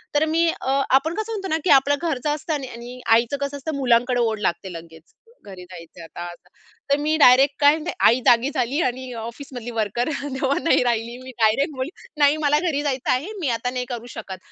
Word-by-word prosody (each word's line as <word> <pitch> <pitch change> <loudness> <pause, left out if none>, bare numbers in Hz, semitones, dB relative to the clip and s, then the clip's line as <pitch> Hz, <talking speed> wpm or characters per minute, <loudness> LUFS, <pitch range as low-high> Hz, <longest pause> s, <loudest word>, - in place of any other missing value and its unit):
तर 295 +2 +3
मी 330 +2 +2
अ, 270 +1 +1
आपण 310 +5 +3
कसं 435 +1 -4
म्हणतो 390 -3 -4
ना - - +1
की - - -1
आपलं 280 +2 0
घरचं 305 -4 -2
असतं. 310 +2 -4
आणि 280 -3 -3
आणि 240 +2 -9
आईचं 235 +4 +3
कसं 280 0 -3
असतं 290 +2 -5
मुलांकडे 245 -2 +2
ओढ 225 -2 0
लागते 185 -1 -2
लगेच 165 -1 -12 0.3
घरी 190 -3 -10
जायचं 175 -1 -12
आता 165 - -10
असं. 175 +1 -17 0.4
तर 280 - +4
मी 305 +2 0
डायरेक्ट 270 0 +6
काय 285 0 +7
म्हणते 320 +2 -4 0.2
आई 240 +3 +4
जागी 240 +3 +4
झाली 260 +6 -1
आणि 255 -2 -2
ऑफिसमधली 245 +1 -8
वर्कर 225 +2 -1
तेव्हा 275 -1 -2
नाही 330 - +3
राहिली. 235 0 -1
मी 260 - -9
डायरेक्ट 230 +8 +2
बोलली 260 +2 -3 0.3
"नाही 290 +1 +4
मला 295 +1 +3
घरी 315 -5 -1
जायचं 270 -3 -1
आहे 285 +11 -1
मी 325 - -2
आता 230 +2 -3
नाही 250 0 -3
करू 240 -2 -5
शकत." 190 -4 -8
260 Hz, 210 wpm, -22 LUFS, 230-290 Hz, 0.4 s, काय